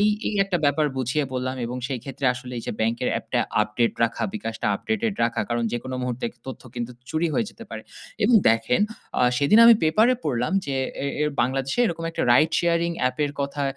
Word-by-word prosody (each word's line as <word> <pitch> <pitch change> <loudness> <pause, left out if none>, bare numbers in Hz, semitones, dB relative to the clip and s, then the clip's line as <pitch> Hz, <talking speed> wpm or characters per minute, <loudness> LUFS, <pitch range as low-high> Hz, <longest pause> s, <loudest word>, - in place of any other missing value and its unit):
এই, 210 - +4 0.2
এই 215 - -3
একটা 190 -3 -1
ব্যাপার 145 +1 +2
বুঝিয়ে 135 +4 0
বললাম 130 +1 -2
এবং 120 +2 -4
সেইক্ষেত্রে 135 +1 -4
আসলে 125 0 -9
এই - - -6
যে - - -2
ব্যাংকের 115 +3 0
অ্যাপটা - - -1 0.2
আপডেট 110 +3 0
রাখা, 115 - -3
bKash 115 - -5
টা - - +1
আপডেটেড 220 - -2
রাখা, 115 - -1
কারণ 120 0 -1
যেকোনো 130 +2 -4
মুহূর্তে 125 -1 -3 0.2
তথ্য 130 - -7
কিন্তু 120 0 -4 0.2
চুরি 160 +2 0
হয়ে 230 - +1
যেতে - - -12
পারে। - - -6 0.4
এবং 245 - +4 0.2
দেখেন 115 - +1 0.4
আ - - 0 0.2
সেদিন 145 +11 +4
আমি 235 - +9
পেপারে 215 +11 +4
পড়লাম 125 -2 -1
যে 140 - -2 0.3
এ - - 0 0.2
এর 150 - +1
বাংলাদেশে 135 - -1
এরকম 165 -3 -3
একটা - - -3
রাইড 155 +6 +5
শেয়ারিং 170 0 +1
অ্যাপের 130 +3 0
কথা 140 +1 -2
135 Hz, 195 wpm, -24 LUFS, 125-165 Hz, 0.4 s, আমি